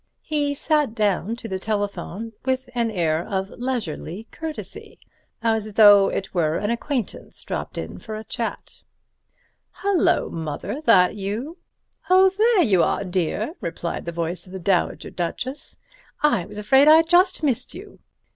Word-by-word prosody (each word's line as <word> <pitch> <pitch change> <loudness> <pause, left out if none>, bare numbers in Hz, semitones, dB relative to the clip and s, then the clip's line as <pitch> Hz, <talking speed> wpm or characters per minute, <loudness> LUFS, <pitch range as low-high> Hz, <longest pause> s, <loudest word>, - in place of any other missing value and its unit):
He 290 -2 -1
sat 295 -5 0
down 210 0 0
to 235 - -8
the 190 -3 -3
telephone 205 +1 -3
with 260 -1 -2
an 235 -2 0
air 170 -5 0
of 190 0 -3
leisurely 220 - -4
courtesy, 320 -1 -8 0.5
as 220 -2 0
though 205 -2 +8
it 195 - -4
were 160 -3 +1
an 205 +2 -1
acquaintance 235 -1 -4
dropped - - -5
in - - -6
for 220 - -7
a 215 - -6
chat. - - -5 1.0
"Hullo, 395 -4 +2
Mother—that 180 - +1
you?" 225 - -4 0.5
"Oh, 375 +1 +6
there 435 -2 +4
you 190 - +3
are, - - +1
dear," 185 - -2
replied 170 -2 -4
the 170 - -3
voice 170 +2 -4
of 185 - -13
the 190 - -5
Dowager 180 0 0
Duchess. 250 +10 -4 0.5
"I 235 - +2
was - - -10
afraid 265 +7 +4
I'd 320 +1 +7
just 360 0 +3
missed 260 -1 -1
you." 395 +3 -11
220 Hz, 145 wpm, -23 LUFS, 190-285 Hz, 1.0 s, though